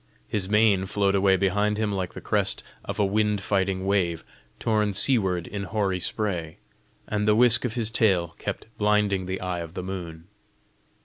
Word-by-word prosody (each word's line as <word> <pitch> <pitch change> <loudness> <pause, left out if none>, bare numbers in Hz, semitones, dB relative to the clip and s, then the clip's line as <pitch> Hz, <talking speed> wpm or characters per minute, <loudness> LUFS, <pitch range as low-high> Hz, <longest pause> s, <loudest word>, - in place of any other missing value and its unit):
His 100 -3 -2
mane 105 -3 +3
flowed 100 0 +1
away 95 -1 +4
behind 105 +3 +1
him 110 -1 -1
like 95 -3 -3
the - - -7
crest - - 0 0.2
of - - -5
a 105 - +2
wind 105 +1 +1
fighting 95 -1 -1
wave, 90 -4 0 0.3
torn 105 -2 0
seaward 95 -6 +3
in 100 0 -5
hoary 100 -2 -1
spray, 90 -6 -2 0.5
and 105 0 -1
the 105 - +5
whisk 115 0 +4
of 115 - -3
his 115 -2 0
tail 95 -7 +2
kept - - -5
blinding 105 -3 +1
the 95 0 -3
eye 90 -1 -3
of 85 +1 -8
the 90 - -4
moon. 85 -3 -7
100 Hz, 175 wpm, -25 LUFS, 95-105 Hz, 0.5 s, the